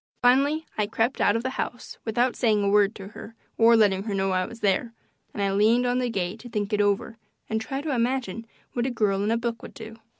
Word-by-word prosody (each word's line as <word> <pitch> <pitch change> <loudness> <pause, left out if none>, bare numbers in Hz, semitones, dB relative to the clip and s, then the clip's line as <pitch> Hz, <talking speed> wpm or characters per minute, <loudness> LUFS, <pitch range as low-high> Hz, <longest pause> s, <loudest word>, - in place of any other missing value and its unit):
Finally 280 +6 +3
I 210 - +2
crept 225 +4 0
out 205 - +4
of 230 - -1
the 260 - -2
house 245 - -7
without 240 +2 +1
saying 215 -4 +2
a 200 - +2
word 205 +1 +3
to 195 -1 -9
her 225 +1 -11 0.2
or 230 +1 +7
letting 200 -4 +3
her 205 -3 -2
know 195 0 0
I 185 0 0
was 230 - -11
there, 210 +4 +1 0.4
and 205 - -3
I 195 - +1
leaned 220 +5 +3
on 245 +1 +1
the 250 -1 0
gate 195 0 -3
to 245 - -10
think 210 -1 -3
it 210 - +3
over 205 +3 0 0.3
and 220 0 -1
try 270 +5 -4
to 300 -1 -2
imagine 235 -3 -1 0.3
what 240 +1 0
a - - 0
girl 205 -5 0
in 210 - 0
a 230 - +2
book 235 0 -3
would - - -11
do. 225 0 -9
225 Hz, 245 wpm, -25 LUFS, 205-245 Hz, 0.4 s, or